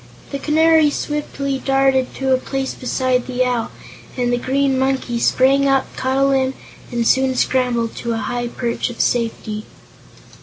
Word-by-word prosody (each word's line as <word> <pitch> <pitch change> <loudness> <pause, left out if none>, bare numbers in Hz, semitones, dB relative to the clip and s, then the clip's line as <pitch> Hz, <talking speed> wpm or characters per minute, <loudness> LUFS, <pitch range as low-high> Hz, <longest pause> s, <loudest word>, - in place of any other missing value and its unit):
The 280 - -3
Canary 315 +1 +4
swiftly 280 -2 -3
darted 270 -1 +1
to 265 -1 +1
a - - +4
place 270 0 -3
beside 255 0 -1
the 255 0 0
Owl, 245 -2 -1 0.5
and 245 -1 0
the 245 - +1
Green 270 +1 +1
Monkey 265 -3 0
sprang 275 +3 +3
up, 270 -1 +1
caught 260 +1 -1
a 275 - +4
limb, 265 -1 +1 0.4
and 240 -1 -1
soon 265 0 +3
scrambled 245 -3 0
to 235 -1 -2
a - - -2
high 240 +2 -3
perch 235 0 -2
of 240 - -9
safety. 225 -3 -1
260 Hz, 160 wpm, -19 LUFS, 245-270 Hz, 0.5 s, Canary